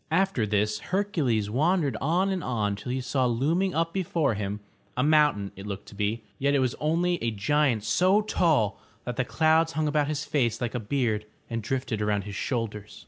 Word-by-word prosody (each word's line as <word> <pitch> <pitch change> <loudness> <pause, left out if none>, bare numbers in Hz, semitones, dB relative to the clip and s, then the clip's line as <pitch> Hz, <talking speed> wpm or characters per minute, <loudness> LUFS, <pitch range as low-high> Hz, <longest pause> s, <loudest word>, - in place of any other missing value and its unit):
After 170 - +1
this 105 +1 +1
Hercules 160 - 0
wandered 150 - +2
on 175 +7 +2
and 185 -2 -2
on 105 -5 -1
till 105 +5 -6
he 130 +1 -1
saw 130 +1 +1
looming 160 +11 +1
up 165 +1 0
before 165 -8 0
him, 105 0 -3 0.2
— - - -36
a 125 - +2
mountain 150 -10 +3
it 100 +2 -9
looked 100 -1 -5
to - - -14
be, 105 +3 -1 0.2
yet 140 +1 +2
it - - +3
was 130 -2 +1
only 170 +3 +1
a 115 - +2
giant 115 +2 +1
so 185 - +3
tall 155 - +1 0.3
that 125 - -3
the 125 - +1
clouds 160 +4 +2
hung 155 0 0
about 150 -1 +1
his 150 -1 -2
face 120 -6 0
like 120 -2 -2
a 125 - -1
beard 110 -2 -1 0.2
and 115 0 -2
drifted 120 -2 -2
around 105 -1 0
his 100 0 -7
shoulders. 105 -2 -4
130 Hz, 200 wpm, -27 LUFS, 105-160 Hz, 0.3 s, mountain